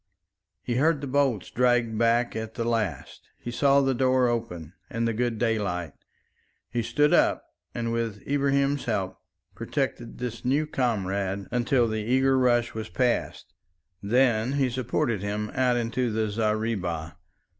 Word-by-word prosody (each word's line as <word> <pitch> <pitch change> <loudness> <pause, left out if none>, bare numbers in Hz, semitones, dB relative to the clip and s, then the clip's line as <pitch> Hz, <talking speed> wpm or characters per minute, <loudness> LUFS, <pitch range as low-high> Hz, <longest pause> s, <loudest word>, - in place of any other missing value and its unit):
He 120 -1 -1
heard 155 +2 +3
the 145 - -5
bolts 135 -7 0
dragged 120 -2 +2
back 115 +1 +2
at 110 0 -5
the 115 - -2
last; 110 - -3
he 120 - -6
saw 140 +3 +4
the 135 -1 +2
door 130 0 +3
open 90 -9 -4 0.2
and 115 0 -1
the 115 - 0
good 120 0 -1
daylight. 100 -9 -1 0.8
He 120 - 0
stood 145 +6 +2
up - - +3 0.3
and 115 -1 -2
with 115 -3 -3
Ibrahim's 140 0 +1
help 95 -5 -2 0.3
protected 120 - -3
this 120 -2 -5
new 140 +5 +1
comrade 100 -8 -1
until 120 0 +2
the 110 -1 -2
eager 130 +4 +2
rush 120 -2 +2
was 110 -1 -5
past. 120 +7 -1 0.5
Then 120 +2 +2
he 135 -3 +1
supported 120 -4 -1
him 105 +1 -3
out 125 -1 +2
into 120 +1 -1
the 110 -1 -1
zareeba. 105 -7 -1
115 Hz, 145 wpm, -26 LUFS, 110-130 Hz, 0.8 s, saw